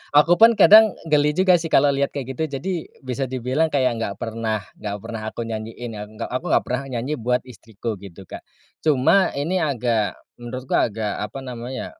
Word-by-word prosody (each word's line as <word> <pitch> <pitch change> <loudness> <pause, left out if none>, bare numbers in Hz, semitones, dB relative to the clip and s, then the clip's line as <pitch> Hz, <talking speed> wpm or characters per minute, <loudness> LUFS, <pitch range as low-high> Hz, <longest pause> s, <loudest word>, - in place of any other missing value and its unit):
aku 165 +5 +5
pun 230 0 +7
kadang 215 +1 +7 0.2
geli 150 0 +3
juga 185 -2 +4
sih 165 - -4
kalau 145 -1 +4
lihat 140 +1 -1
kayak 135 -2 -4
gitu 160 +5 -2
jadi, 185 +8 -3 0.3
bisa 130 +1 -3
dibilang 130 +5 0
kayak 130 -6 0
nggak 100 -3 -3
pernah 110 -2 -3 0.2
nggak 105 -1 -4
pernah 115 -1 -6
aku 115 +1 -4
nyanyiin 115 0 -6
ya 105 - -6
nggak 110 +2 -7
aku 130 +8 -3
nggak - - +3
pernah 125 +2 -2
nyanyi 130 +3 -3
buat 125 +2 0
istriku 115 -4 -7
gitu 95 -1 -11
Kak. - - -9 0.4
Cuma 155 +6 +3
ini 165 +7 -1
agak, 120 -8 0 0.2
menurutku 125 +2 -7
agak 105 -1 -1
apa 130 +6 -5
namanya, 125 0 -6
125 Hz, 185 wpm, -22 LUFS, 115-150 Hz, 0.4 s, pun